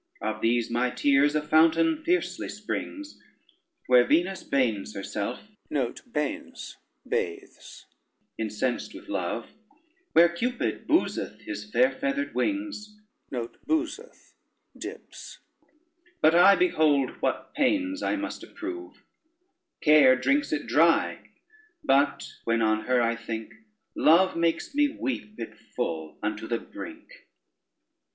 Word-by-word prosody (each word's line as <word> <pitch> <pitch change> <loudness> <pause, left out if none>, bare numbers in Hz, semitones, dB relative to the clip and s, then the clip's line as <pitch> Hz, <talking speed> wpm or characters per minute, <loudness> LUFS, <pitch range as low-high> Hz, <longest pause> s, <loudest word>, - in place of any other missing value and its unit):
Of 110 0 -3
these 120 0 +1
my 120 +2 +1
tears 145 +3 +3
a 150 - +1
fountain 165 - +3
fiercely 355 +2 0
springs, 300 0 -6 0.6
Where 125 -1 +6
Venus 175 +8 +1
bains 115 -8 -1
herself 100 +4 -4 3.0
incensed 110 +3 -2
with - - -12
love, 100 +4 -3 0.6
Where 170 +1 +7
Cupid 240 +9 -2
bowseth 325 +2 0
his - - -7
fair 255 - +3
feathered 280 +1 -2
wings; 295 -9 -3 0.3
But 120 -2 -5 2.8
I 180 +3 +7
behold 155 - +3
what 130 -1 -2
pains 285 0 +1
I - - 0
must 300 0 -5
approve. 350 +1 -8 0.8
Care 150 -4 +7
drinks 135 +3 +1
it 150 -1 -1
dry; 165 +2 +2 0.5
but 140 +2 +2
when 115 0 +1
on 110 0 +1
her 125 -1 +2
I 115 0 +1
think, 115 -1 -6 0.4
Love 175 +4 +4
makes 165 - 0
me 295 +1 +4
weep 115 - -5
it 115 - -6 0.2
full 80 -1 -3
unto 110 +1 -3
the 115 - 0
brink. 330 +10 -11
145 Hz, 105 wpm, -27 LUFS, -, 3.0 s, Where